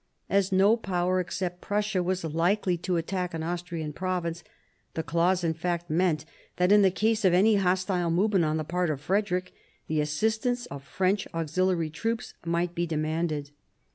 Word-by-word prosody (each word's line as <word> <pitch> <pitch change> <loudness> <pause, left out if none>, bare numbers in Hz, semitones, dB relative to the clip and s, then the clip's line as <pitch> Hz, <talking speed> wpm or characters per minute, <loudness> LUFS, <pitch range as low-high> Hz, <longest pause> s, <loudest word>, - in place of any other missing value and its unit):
As 195 0 +2
no 195 +4 +5
Power 185 -3 0
except 180 0 -3
Prussia 205 -2 0
was 185 0 -1
likely 175 +4 +1
to 180 +1 -1
attack 180 +1 -2
an 160 - -3
Austrian 170 -2 -4
province, 175 -1 -2 0.5
the 160 - -1
clause 170 +4 +1
in 165 -1 +1
fact 175 0 -3
meant 160 -2 +1 0.3
that 180 +2 +2
in 210 0 +7
the 195 - +6
case 220 +3 +1
of 185 -2 +5
any 210 +3 +5
hostile 185 -2 +1
movement 185 +1 +2
on 155 +1 0
the 155 - -1
part 175 +2 -1
of 150 -3 -2
Frederick, 185 +3 -1 0.3
the 155 -1 0
assistance 220 +11 0
of 140 - -6
French 190 +6 0
auxiliary 165 0 0
troops 225 +7 -3
might 170 +1 -1
be 175 0 -1
demanded. 155 -2 -2
180 Hz, 170 wpm, -27 LUFS, 165-190 Hz, 0.5 s, in